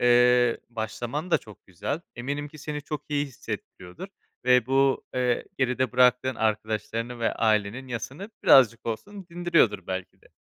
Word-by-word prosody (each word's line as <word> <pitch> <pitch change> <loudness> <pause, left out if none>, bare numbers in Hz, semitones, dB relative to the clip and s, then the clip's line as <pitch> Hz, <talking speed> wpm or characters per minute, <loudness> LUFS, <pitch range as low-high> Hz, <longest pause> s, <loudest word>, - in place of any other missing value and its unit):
eee, 125 0 +4
başlaman 120 +8 -4
da - - +4
çok 105 -2 -16
güzel. 95 - -4 0.2
Eminim 140 +4 -3
ki 155 - -14
seni 150 0 -5
çok 150 0 -5
iyi 145 0 0
hissettiriyordur 115 - -8 0.4
ve 125 -2 +4
bu, 135 0 +2
eee, 125 -1 +1
geride 130 -1 0
bıraktığın 125 +1 +4
arkadaşlarının 110 +2 -2
ve 115 - +1
ailenin 110 +3 0
yasını 135 - -6
birazcık 120 -4 +6
olsun 195 - -5
dindiriyordur 165 - +2
belki 95 0 -5
de. - - -20
125 Hz, 145 wpm, -26 LUFS, 110-140 Hz, 0.4 s, birazcık